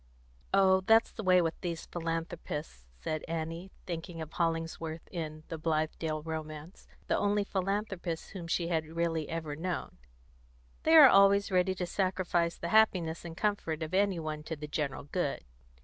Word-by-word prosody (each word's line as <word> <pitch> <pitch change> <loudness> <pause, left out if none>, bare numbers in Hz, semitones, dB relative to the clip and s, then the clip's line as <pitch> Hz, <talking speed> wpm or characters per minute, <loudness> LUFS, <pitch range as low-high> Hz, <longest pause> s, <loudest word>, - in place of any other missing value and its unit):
"Oh, 190 -1 +5
that's 225 +1 +5
the - - -6
way 185 -3 +5
with 165 -1 -3
these 170 -2 -4
philanthropists," 165 - -4
said 155 -1 -3
Annie, 165 +2 -4 0.2
thinking 170 -1 -5
of 160 -1 -7
Hollingsworth, 165 -1 -2
in 155 -3 -5
The 165 - -5
Blithedale 155 -1 -1
Romance, 155 +1 -7 0.2
the - - +1
only 205 0 +2
philanthropist 190 -3 -2
whom 180 -4 -7
she 170 0 0
had 160 -2 +1
really 165 -1 -1
ever 160 -3 -3
known, 175 - -4 0.8
"They 320 - +4
are 300 -4 +11
always 200 -1 +5
ready 185 0 +2
to 180 - -2
sacrifice 180 -2 0
the 170 - -4
happiness 180 -7 +3
and 170 -1 -8
comfort 180 -7 -1
of 155 - -6
any 195 -2 +2
one 155 -1 -4
to 160 - -4
the 150 0 -7
general 145 -2 -2
good." 145 0 -2
170 Hz, 160 wpm, -31 LUFS, 160-190 Hz, 0.8 s, are